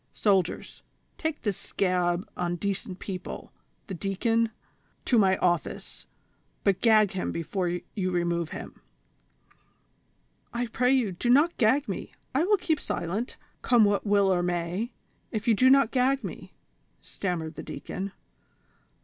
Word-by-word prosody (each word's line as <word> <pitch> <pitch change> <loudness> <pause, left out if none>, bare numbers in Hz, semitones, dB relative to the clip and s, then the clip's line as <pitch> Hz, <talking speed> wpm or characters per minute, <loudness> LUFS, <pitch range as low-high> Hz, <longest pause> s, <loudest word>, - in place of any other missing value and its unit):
Soldiers, 190 -5 0 0.4
take 315 -1 -2
this 205 -4 -1
scab 180 -1 0
on 175 -1 -1
decent 195 0 -3
people 185 -2 -7 0.2
— - - -43
the 195 - -6
deacon 205 +5 +1
(V) 225 - -7 0.3
— - - -40
to 240 - +4
my 190 -2 +4
office, 175 -2 -1 0.6
but 195 -2 +2
gag 215 -4 +5
him 190 - -2
before 180 +3 -2 0.3
you 185 -3 -1
remove 170 -2 0
him - - -8 0.5
" - - -38
— - - -42
"I - - +1
pray 250 +2 +1
you, 250 -7 +2
do 185 +7 -2
not 295 +7 +5
gag 265 +5 +3
me; - - -5 0.2
I 290 +6 +2
will 415 +2 +4
keep 320 -4 0
silent, 195 +9 -3 0.2
come 240 -4 +5
what 205 0 +2
will 200 -2 +3
or 175 - +1
may, 175 +6 -1 0.4
if 220 +1 -3
you 230 - +6
do 255 +5 +5
not 275 -3 +5
gag 265 +1 +2
me," - - -7 0.5
stammered 170 -4 -3
the - - -7
deacon. 190 +7 -5
200 Hz, 155 wpm, -27 LUFS, 180-240 Hz, 0.6 s, you